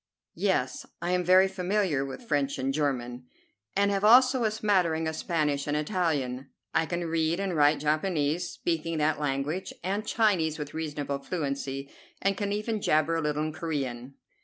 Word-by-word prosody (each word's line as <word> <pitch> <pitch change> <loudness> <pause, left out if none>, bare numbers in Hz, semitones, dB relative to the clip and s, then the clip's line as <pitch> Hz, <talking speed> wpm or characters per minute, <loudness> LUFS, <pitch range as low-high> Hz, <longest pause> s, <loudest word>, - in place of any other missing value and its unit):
"Yes, - - -1
I 175 +1 -2
am 180 0 +1
very 185 +2 +6
familiar 190 -5 0
with 140 - -7
French 145 -9 0
and 135 +1 -1
German, 125 -4 -2 0.5
and 200 +1 +3
have 200 0 -1
also 255 +3 +6
a 220 - +3
smattering 185 -7 +1
of 160 - -2
Spanish 150 -4 -1
and 145 +1 0
Italian. 145 -6 -1 0.2
I 160 - +2
can 175 0 -2
read 165 +1 0
and 195 -3 -1
write 145 -1 +4
Japanese, 155 +1 0
speaking 165 -1 -2
that 150 0 +1
language 145 +5 -2
and 200 +4 -1
Chinese 195 -9 +1
with 145 -1 -6
reasonable 145 -3 -3
fluency, 140 -3 -4 0.3
and 195 0 +1
can 200 -1 -2
even 215 +1 -2
jabber 155 0 +2
a - - 0
little 150 0 -1
in 155 0 -3
Corean." 135 -6 -4
160 Hz, 165 wpm, -28 LUFS, 145-185 Hz, 0.5 s, very